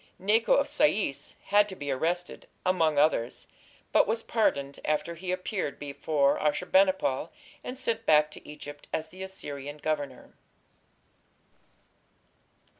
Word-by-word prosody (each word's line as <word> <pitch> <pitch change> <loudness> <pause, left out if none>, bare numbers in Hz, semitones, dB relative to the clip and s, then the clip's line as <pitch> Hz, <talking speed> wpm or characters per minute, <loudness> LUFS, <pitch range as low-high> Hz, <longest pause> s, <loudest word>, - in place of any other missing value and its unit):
Necho 215 +4 +3
of 280 - +2
Sais 285 - +1
had 205 +1 +4
to 190 - -6
be 145 -5 -4
arrested, 175 +6 -1 0.2
among 165 -5 +2
others, 145 -5 +2 0.4
but - - +5
was 225 +2 -1
pardoned 140 -11 0
after 155 +2 0
he 180 +2 -5
appeared 185 -4 -2
before 140 0 +1
Ashur 150 +4 0
bani 190 +1 +5
pal, 150 -3 -2 0.3
and 250 - -6
sent 225 -2 -2
back 150 0 +5
to - - -12
Egypt 145 -1 -9
as 160 0 -2
the 185 +3 -12
Assyrian 145 -7 -6
governor. 145 -4 -3
160 Hz, 130 wpm, -28 LUFS, 145-195 Hz, 0.4 s, but